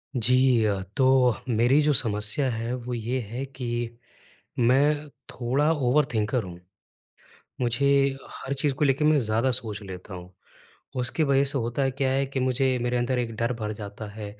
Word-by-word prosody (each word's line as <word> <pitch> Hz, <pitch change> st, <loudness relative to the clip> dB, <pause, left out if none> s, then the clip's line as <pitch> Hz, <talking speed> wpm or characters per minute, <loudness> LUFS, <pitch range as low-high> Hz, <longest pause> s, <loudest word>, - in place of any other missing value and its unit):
जी 125 Hz, 0 st, +4 dB
अ, 100 Hz, -2 st, 0 dB, 0.2 s
तो 130 Hz, -3 st, +4 dB
मेरी 120 Hz, +6 st, +3 dB
जो 150 Hz, 0 st, +2 dB
समस्या 110 Hz, +3 st, +2 dB
है 115 Hz, +1 st, -3 dB
वो 125 Hz, 0 st, -5 dB
ये 120 Hz, +2 st, -2 dB
है 125 Hz, +4 st, -4 dB
कि 120 Hz, -3 st, -5 dB, 0.6 s
मैं 145 Hz, +5 st, +2 dB, 0.2 s
थोड़ा 135 Hz, +5 st, 0 dB
ओवरथिंकर 125 Hz, -5 st, +1 dB
हूँ। 90 Hz, -1 st, -9 dB, 1.0 s
मुझे 125 Hz, +3 st, +1 dB, 0.5 s
हर 135 Hz, -, -6 dB
चीज़ 140 Hz, 0 st, 0 dB
को 145 Hz, -, 0 dB
लेके 140 Hz, +1 st, +1 dB
मैं 155 Hz, 0 st, +4 dB
ज़्यादा 115 Hz, +1 st, +1 dB
सोच 110 Hz, -4 st, -2 dB
लेता 95 Hz, 0 st, -9 dB
हूँ 90 Hz, 0 st, -10 dB, 0.7 s
उसकी 125 Hz, +6 st, 0 dB
वज़ह 140 Hz, -1 st, +3 dB
से 140 Hz, 0 st, +1 dB
होता 120 Hz, +3 st, -2 dB
है 135 Hz, -, +1 dB
क्या 130 Hz, 0 st, -1 dB
है 135 Hz, +1 st, +1 dB
कि 135 Hz, 0 st, -3 dB
मुझे 130 Hz, 0 st, +1 dB
मेरे 120 Hz, 0 st, -1 dB
अंदर 125 Hz, +1 st, 0 dB
एक 115 Hz, -2 st, -3 dB
डर 115 Hz, +2 st, 0 dB
भर 105 Hz, 0 st, -3 dB
जाता 105 Hz, 0 st, -8 dB
है। 105 Hz, 0 st, -8 dB
125 Hz, 170 wpm, -25 LUFS, 115-135 Hz, 1.0 s, जी